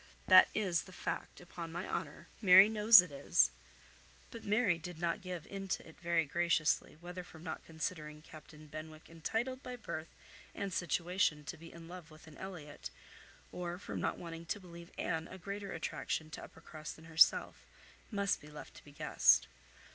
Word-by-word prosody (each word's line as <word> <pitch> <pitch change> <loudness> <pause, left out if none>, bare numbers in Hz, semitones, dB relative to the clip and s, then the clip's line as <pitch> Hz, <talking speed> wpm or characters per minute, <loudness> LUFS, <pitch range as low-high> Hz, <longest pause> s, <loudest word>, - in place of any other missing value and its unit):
That - - +8
is 185 -6 0
the 185 - -13
fact, - - -5
upon 170 -2 -8
my 175 +3 -4
honour. - - -5
Mary 190 0 +9
knows 215 -2 +8
it 180 - -10
is." 100 - +3 0.8
But 230 - -9
Mary 205 -4 +2
did 175 +1 -8
not 170 +4 -1
give 180 -3 -6
into 195 -3 -4
it 160 - -15
very 170 -1 +1
graciously, 165 -1 +1
whether 180 +1 -7
from 160 -2 -14
not 160 -3 -5
considering 155 -2 -5
Captain 155 -1 -13
Benwick 155 +1 -10
entitled 225 +10 -2
by 250 -2 -6
birth 165 -9 -6 0.5
and 200 -2 -3
situation 175 -2 0
to - - -6
be 165 +1 -12
in 165 -1 -11
love 175 -2 -10
with 155 +1 -15
an 160 -2 -14
Elliot, 150 - -8 0.6
or 175 -1 -4
from 195 - -5
not - - -1
wanting 165 -1 -8
to 205 - -2
believe 170 -2 -12
Anne 160 0 -2
a 190 - -9
greater 200 +1 -6
attraction 160 -1 -3
to - - -7
Uppercross 155 -1 -9
than 160 - -15
herself, 165 0 +4 0.5
must 200 -2 0
be 150 - -12
left 150 0 -10
to - - -14
be 145 - -15
guessed. 140 - +4
170 Hz, 175 wpm, -34 LUFS, 160-190 Hz, 0.8 s, Mary